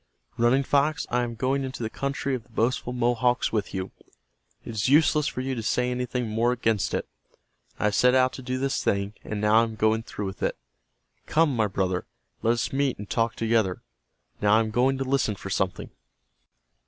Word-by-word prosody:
Running 120 +4 +3
Fox, 145 +3 +1
I 125 +1 +2
am 120 -1 -3
going 135 +4 0
into 130 -2 -5
the 110 - -2
country 140 0 -2
of 125 - -2
the 120 - -28
boastful 120 +2 0
Mohawks 125 0 +1
with 105 -3 -1
you. 95 -1 -4 0.7
It - - -6
is 110 +2 0
useless 150 +1 +4
for 130 - -3
you 130 +1 -2
to 120 - -3
say 125 +3 0
anything 125 -1 -2
more 115 +3 +1
against 115 -4 0
it. - - -3 0.7
I - - -4
have 105 0 +2
set 125 +4 +4
out 130 0 +3
to - - -7
do 130 0 -3
this 135 +1 -1
thing, 100 +1 0
and 110 - -4
now 105 +1 +4
I - - +4
am 110 -1 -4
going 110 +1 +2
through 105 -2 -6
with 95 - -6
it. - - -1 0.7
Come, 155 -4 +3
my 110 -2 +2
brother, 95 -2 -1 0.3
let 115 - +3
us 115 +1 -2
meet, 135 -1 +1
and 105 - -8
talk 115 +2 0
together. 110 -5 0 0.6
Now 105 +1 +4
I - - +5
am 110 -1 -2
going 130 +4 +2
to 135 - -1
listen 130 -5 0
for 95 0 -8
something." 95 -1 -2
120 Hz, 205 wpm, -26 LUFS, 110-130 Hz, 0.7 s, I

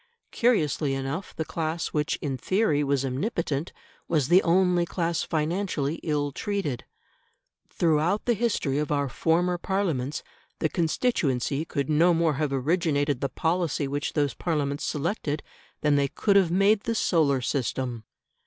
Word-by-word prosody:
Curiously 155 - +1
enough 135 +7 -4
the 160 - -3
class 160 +1 -2
which 150 0 0
in 140 -3 -1
theory 155 - +1
was 140 -1 0
omnipotent, 150 - -2 0.4
was 150 -6 +1
the 180 +2 +7
only 180 0 +3
class 170 -1 -1
financially 160 -2 -1
ill 145 -2 -1
treated. 185 - -3 0.8
Throughout 165 +4 +1
the 240 - +3
history 205 - 0
of 150 -1 -2
our 145 -1 +1
former 175 +6 +1
Parliaments 165 -9 -1 0.3
the 160 - 0
constituency 155 - 0
could 140 -4 -2
no 165 +3 +4
more 165 -1 +2
have 150 -2 0
originated 145 -1 0
the 140 - 0
policy 160 -4 0
which 145 +1 -3
those 145 -3 +1
Parliaments 145 -4 -2
selected 155 -1 -2 0.4
than 150 -1 +3
they 140 0 +2
could 200 +8 +1
have 190 -4 +5
made 195 +4 +4
the 230 - 0
solar 155 -10 +2
system. 125 -2 -2
155 Hz, 145 wpm, -26 LUFS, 140-175 Hz, 0.8 s, the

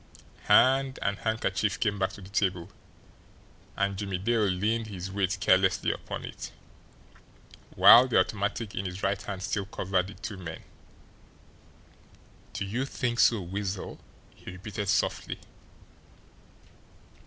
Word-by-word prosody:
Hand 135 +1 +4
and 100 +1 -1
handkerchief 110 -2 -1
came 105 -3 0
back 95 - +1
to - - -11
the 95 - -11
table, 95 -2 -1 1.1
and 100 0 0
Jimmie 100 -2 -3
Dale 110 +3 +1
leaned 105 +4 0
his 95 -2 -6
weight 95 -1 0
carelessly 95 0 +3
upon - - -6
it, - - -8 1.2
while 125 +2 +9
the 120 - +3
automatic 105 +2 -1
in 95 - -3
his 90 +1 -6
right 100 +1 0
hand 100 -2 -6
still 100 +2 -2
covered 95 -2 -1
the 100 - -10
two 105 -4 -7
men. 85 -3 -8 1.9
"Do - - -3
you 115 +7 -2
think 125 -3 -2
so, 115 -4 +4
Weasel?" 95 +1 -4 0.3
he - - -12
repeated 100 +2 -5
softly. - - 0
100 Hz, 130 wpm, -28 LUFS, 95-110 Hz, 1.9 s, while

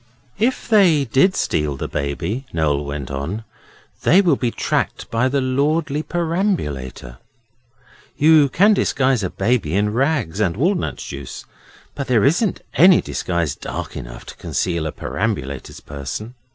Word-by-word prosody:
'If 245 +4 0
they 180 - +4
did 135 - +3
steal 75 -2 -1
the - - -4
Baby,' 85 - -3
Noel 75 -3 0
went 70 -2 -5
on, 80 +11 -4 0.6
'they 185 +5 +5
will 170 -7 +3
be 125 -2 -1
tracked - - -2
by 115 +3 +2
the 140 +1 +1
lordly 145 +3 0
perambulator. 160 - -2 1.0
You 150 -1 +5
can 205 +9 +4
disguise 130 - +1
a 95 - -1
baby 105 -9 0
in 105 +1 +1
rags 130 - 0
and 95 -4 +1
walnut 175 - 0
juice, 70 -2 -8 0.5
but 140 - -5
there 120 -4 +3
isn't 180 +8 +1
any 180 +1 +7
disguise 85 -5 -2
dark - - -6
enough - - -8
to - - -10
conceal 85 -3 -2
a - - -3
perambulator's 70 - -4
person. 75 - -6
115 Hz, 140 wpm, -20 LUFS, -, 1.0 s, any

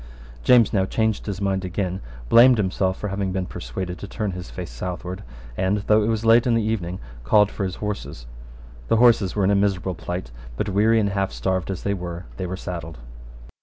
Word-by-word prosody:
James 120 -4 +5
now 95 -3 +3
changed 110 +2 -1
his 100 -3 -3
mind 95 -1 0
again, 95 0 -3 0.3
blamed 120 - +7
himself 95 -2 0
for 105 - -4
having 100 -1 -2
been 95 0 -2
persuaded 90 +7 -6
to 100 - -7
turn 105 0 -3
his 90 -6 -7
face - - -7
southward, 90 +7 -5 0.3
and, 95 +6 +1
though 110 0 +4
it 105 - 0
was 115 0 -1
late 115 +2 +5
in 120 - +3
the 115 - +1
evening, 95 -5 -2 0.3
called 105 - +4
for 100 - -4
his 90 -1 -4
horses. 105 - -5 0.6
The - - +3
horses 115 -5 +4
were 100 - +1
in 95 - +3
a - - +4
miserable 95 -2 +1
plight; 90 -5 -5 0.3
but, 105 - -1
weary 110 +3 +3
and 100 -2 +1
half 100 -3 -1
starved 90 +10 -2
as 95 -2 -4
they 100 - 0
were, 90 -2 -6
they 95 - -3
were 95 +1 -4
saddled. 85 -3 -6
95 Hz, 205 wpm, -23 LUFS, 90-105 Hz, 0.6 s, blamed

